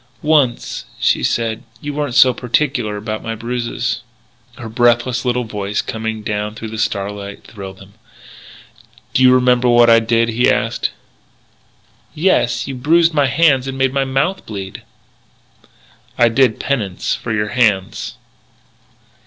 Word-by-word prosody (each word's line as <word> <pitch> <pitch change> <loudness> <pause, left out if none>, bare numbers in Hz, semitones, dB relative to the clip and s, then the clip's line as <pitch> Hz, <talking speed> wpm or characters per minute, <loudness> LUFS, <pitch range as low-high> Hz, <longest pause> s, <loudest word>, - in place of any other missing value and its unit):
"Once," 145 -6 +1
she - - +2
said, 115 -1 -1 0.2
"you 145 +3 -5
weren't 145 -4 -3
so 130 -1 +6
particular 120 -3 -1
about 110 +1 -4
my 115 0 -4
bruises." 120 +1 -3 0.6
Her 120 - -7
breathless 120 +2 +1
little 125 0 0
voice 105 -2 -3
coming 110 -1 -4
down 105 0 -3
through 110 0 -7
the 110 0 -6
starlight 100 -1 -3
thrilled 95 -3 -10
him. 95 +1 -15 1.2
"Do - - +2
you 130 0 +7
remember 125 -1 +3
what 120 -1 +6
I 115 - +7
did?" 115 +1 +1
he 115 +2 +2
asked. - - 0 1.3
"Yes. 155 -7 +1
You 135 - -4
bruised 165 +6 +3
my 145 -3 +3
hands 135 -2 +3
and 135 0 -4
made 135 0 +1
my 140 -1 +1
mouth 135 +8 -1
bleed." 100 -3 -7 1.4
"I 120 -1 +5
did 120 -1 +2
penance 105 -10 -2
for - - -5
your 105 -1 -1
hands." 105 -6 0
120 Hz, 140 wpm, -18 LUFS, 110-130 Hz, 1.4 s, you